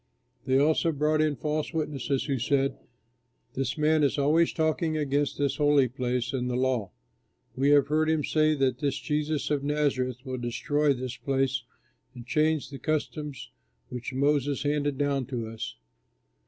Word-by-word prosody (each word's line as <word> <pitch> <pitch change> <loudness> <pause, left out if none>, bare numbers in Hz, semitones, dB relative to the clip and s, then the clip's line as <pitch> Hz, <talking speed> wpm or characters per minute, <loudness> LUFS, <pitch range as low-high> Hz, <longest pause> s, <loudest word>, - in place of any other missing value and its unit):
They 130 0 +3
also 155 +3 +3
brought 155 +1 +1
in 155 -1 +1
false 150 +4 -3
witnesses 140 -3 -1
who 135 -3 -1
said, 135 +2 +1 0.8
"This 130 -1 -2
man 155 +1 +3
is 145 0 +2
always 155 +4 +3
talking 160 0 0
against 145 -1 0
this 140 -2 0
holy 145 -3 +4
place 125 -1 -2
and 125 -1 -1
the 125 - -1
law. 125 -6 0 0.7
We 135 +2 +2
have 145 -2 +6
heard 155 +2 +1
him 160 -2 +1
say 155 +1 +2
that 130 -3 0
this 140 -2 -1
Jesus 150 0 -1
of 145 -2 0
Nazareth 135 -3 -1
will 130 -1 -4
destroy 145 +5 +1
this 130 -1 -5
place 135 -1 0 0.5
and 120 -1 -9
change 155 0 +1
the 135 - -7
customs 150 -2 -3 0.4
which 125 -1 -5
Moses 140 +1 +1
handed 145 -1 0
down 140 -3 0
to 120 -4 -3
us!" 110 0 -6
140 Hz, 160 wpm, -27 LUFS, 130-150 Hz, 0.8 s, have